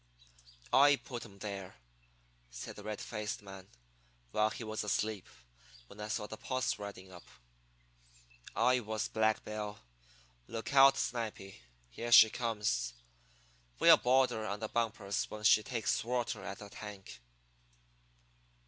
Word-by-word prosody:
"I 145 +1 +7
put 125 -4 -8
'em 100 -3 -14
there," 100 -2 -6 0.7
said - - -8
the - - -10
red 105 0 -5
faced 105 -2 -5
man, 95 -1 -11 0.6
"while 105 0 +2
he 120 - -7
was 110 -1 -3
asleep, 105 -1 -1 0.6
when 100 - -15
I 105 - -4
saw 105 -1 -2
the 110 - -8
posse 130 -3 -2
riding 95 -2 -8
up. 90 -1 -13 1.3
I 125 0 +3
was 110 -2 -3
Black 110 0 +1
Bill. 105 -1 -5 0.7
Look 115 +4 -5
out, 135 0 +7
Snipy, 105 - -4 0.3
here 120 - -5
she 110 -2 +9
comes! 105 - -1 0.8
We'll - - +8
board 130 +1 +3
her 110 - -3
on 100 +1 -3
the 110 0 -4
bumpers 110 -4 -1
when 105 0 -8
she 105 0 +6
takes 115 -2 -1
water 120 -1 -2
at 100 - -6
the 105 -1 -11
tank." 100 - -10
105 Hz, 140 wpm, -33 LUFS, 100-115 Hz, 1.3 s, she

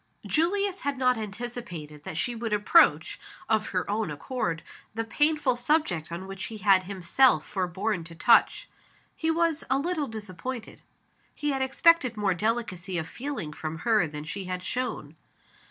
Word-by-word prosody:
Julius 390 +4 +1
had 285 -1 -2
not 255 -1 +3
anticipated 215 - -7
that 160 - -5
sh 165 - 0
e 240 - -4
would 225 -2 -3
approach, 210 +11 +4 0.3
of 220 -1 +1
her 185 -1 -2
own 210 -2 -1
accord, 165 - -3 0.3
the 225 - -1
painful 295 +1 +2
subject 240 - 0
on 170 +3 -5
which 195 +1 -6
he 220 - -7
had 195 -2 +4
himself 190 0 +3
forborne 190 +1 -2
to 165 0 -9
touch. 165 - +4 0.5
He 320 - -1
was 330 -1 +1
a 265 - +3
little 310 0 -1
disappointed. 220 +3 -7 0.5
He 295 -1 -1
had 270 -1 -1
expected 265 -1 +3
more 205 -2 +2
delicacy 190 -3 -2
of 160 -1 -2
feeling 240 - -5
from 155 +1 -5
her 215 -7 +4
than 150 0 -7
she 190 +5 -5
had 180 0 -4
shown. 220 - -3
220 Hz, 160 wpm, -27 LUFS, 180-265 Hz, 0.5 s, approach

